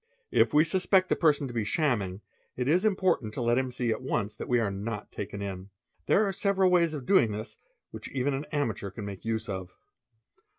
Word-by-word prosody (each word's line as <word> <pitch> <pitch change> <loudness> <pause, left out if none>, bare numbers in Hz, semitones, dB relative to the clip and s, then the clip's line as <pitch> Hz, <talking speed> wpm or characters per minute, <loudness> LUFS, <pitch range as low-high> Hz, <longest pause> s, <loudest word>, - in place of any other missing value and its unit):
If - - +4
we 150 +1 +5
suspect 185 +2 +2
the - - +3
person 150 -4 +2
to 120 - -8
be 115 -2 0
shamming, 105 - 0 0.4
it 125 0 -1
is 175 +7 +3
important 185 - +1
'let 120 0 +2
him 130 -1 -1
see 120 -1 -1
at 110 - -2
once 110 -5 -2
that - - -7
we 120 -1 +3
are 110 -4 0
not 105 +2 -5
taken 100 0 -5
in. 95 -1 -6 0.4
There 215 - +4
are 195 - -1
several 195 -1 +2
ways 170 -3 +3
doing 120 - +4
this 110 +2 -6 0.3
which - - -8
even 135 +1 -1
an 135 +3 -3
amateur 115 -9 -1
can 100 +2 -7
make 100 -2 -7
use 110 0 -2
of. 95 -3 -6
120 Hz, 205 wpm, -28 LUFS, 105-155 Hz, 0.4 s, we